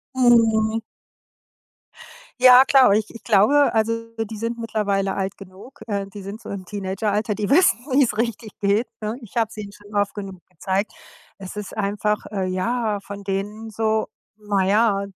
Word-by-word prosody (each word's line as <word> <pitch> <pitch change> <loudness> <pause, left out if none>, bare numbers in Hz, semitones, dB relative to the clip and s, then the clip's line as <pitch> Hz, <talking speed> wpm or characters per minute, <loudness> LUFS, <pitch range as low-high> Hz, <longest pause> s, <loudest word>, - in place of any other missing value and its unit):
Mhm. 225 -3 +3 1.6
Ja 255 0 +9
klar, 270 -1 +5
aber 200 - +5
ich 215 0 +1
ich 230 - -12
glaube, 235 +8 +4
also, 230 +1 0 0.2
die 220 0 -8
sind 230 +2 -3
mittlerweile 200 -4 -1
alt 195 0 -3
genug. 195 +8 -14
Äh, 200 -2 -2
die 200 +1 -10
sind 200 +4 -8
so - - -10
im 195 -2 -6
Teenageralter, 205 +2 -2
die 210 -2 -3
wissen, 355 -3 +4
wie's 255 -5 +3
richtig 230 -1 -2
geht, 205 +4 +1
ne? 215 +1 -3
Ich 230 -2 -14
habe 225 -2 +2
es - - -14
ihnen 205 -1 -7
schon 205 +1 -16
oft 205 0 +1
genug 195 -3 -7
gezeigt. 190 +4 -2 0.4
Es 190 0 -9
ist 210 -1 -7
einfach, 210 +1 -1
äh, 195 -3 -2
ja, 210 +3 -1
von 200 0 -9
denen 205 +3 -4
so, 220 0 0 0.3
na 205 -2 0
ja, 200 0 +2
210 Hz, 170 wpm, -22 LUFS, 200-225 Hz, 1.6 s, Ja